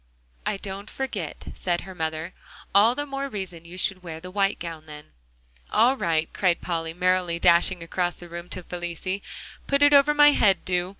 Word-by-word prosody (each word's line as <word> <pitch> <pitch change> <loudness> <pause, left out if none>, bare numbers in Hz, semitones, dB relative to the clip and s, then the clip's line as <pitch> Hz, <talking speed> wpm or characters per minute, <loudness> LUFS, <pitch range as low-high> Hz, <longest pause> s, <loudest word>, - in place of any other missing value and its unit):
"I - - 0
don't 195 +1 -6
forget," 215 - -5
said 175 -1 -1
her 190 - -9
mother; 160 0 -4 0.4
"all 215 +5 +5
the 290 - -3
more 275 0 -4
reason 185 -7 -6
you 175 +2 -10
should 185 0 +1
wear 165 -3 -7
the 180 +2 -9
white 195 0 +1
gown, 165 -2 -7
then." 150 -1 -11 0.6
"All 240 +5 +4
right," 160 -8 0
cried 180 -3 +2
Polly, 165 -2 -3
merrily 180 -1 +1
dashing 170 +1 +3
across 175 +1 -1
the 175 - -10
room 170 +1 -8
to 185 - -5
Felicie, 180 +3 -4 0.5
"put 280 +1 +3
it 290 0 +6
over 285 +1 +6
my 295 0 +8
head, 200 -9 +3
do. 180 0 0
180 Hz, 185 wpm, -25 LUFS, 170-205 Hz, 0.6 s, my